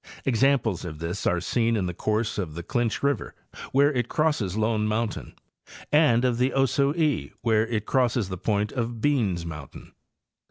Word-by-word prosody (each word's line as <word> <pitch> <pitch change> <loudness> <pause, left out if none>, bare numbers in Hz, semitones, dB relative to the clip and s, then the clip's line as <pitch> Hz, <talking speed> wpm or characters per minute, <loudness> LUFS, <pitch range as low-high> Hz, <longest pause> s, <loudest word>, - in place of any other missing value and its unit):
Examples 125 - +2
of 80 -4 -6
this 85 +5 -3
are 90 - +2
seen 115 +5 0
in 95 - -1
the 90 - -3
course 110 +4 -1
of 80 -6 -4
the 85 - -5
Clinch 120 +6 -1
river 140 -5 -1 0.4
where 140 +2 +4
it 125 -2 -1
crosses 145 - 0
Lone 110 -1 +1
mountain, 110 +1 -3 0.6
and 140 -6 +4
of 120 -2 +1
the 130 +2 +2
Ocoee 140 +3 +1
where 110 -1 +2
it 110 -2 -2
crosses 120 -5 +1
the 95 - -4
point 105 +1 0
of 120 -2 -3
Beans 110 -11 +1
mountain. 75 -5 -9
115 Hz, 165 wpm, -25 LUFS, 100-130 Hz, 0.6 s, where